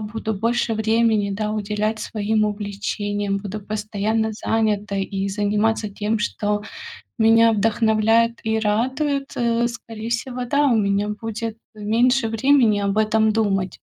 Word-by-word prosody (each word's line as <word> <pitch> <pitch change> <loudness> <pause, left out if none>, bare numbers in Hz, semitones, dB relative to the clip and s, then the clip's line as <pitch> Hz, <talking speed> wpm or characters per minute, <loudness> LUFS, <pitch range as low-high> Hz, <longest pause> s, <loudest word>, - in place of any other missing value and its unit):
буду 220 +1 -4
больше 230 +2 0
времени, 220 -1 +2
да, 210 +2 -2
уделять 215 +1 -2
своим 215 0 0
увлечениям, 205 -1 -2
буду 205 +1 -5
постоянно 215 +1 -2
занятой 210 -2 -1
и 195 0 -3
заниматься 210 +2 0
тем, 210 +2 -2
что 210 0 -1 0.6
меня 225 0 +5
вдохновляет 225 +1 +2
и 220 0 +1
радует, 265 +7 0
э, 235 0 +1
скорее 225 -2 -8
всего, 245 +2 -3
да, 285 +3 +2
у 240 - +3
меня 200 -1 +1
будет 225 0 -4 0.2
меньше 230 +4 +2
времени 230 -1 +3
об 200 0 -1
этом 220 0 +3
думать. 200 -4 0
220 Hz, 130 wpm, -22 LUFS, 205-225 Hz, 0.6 s, меня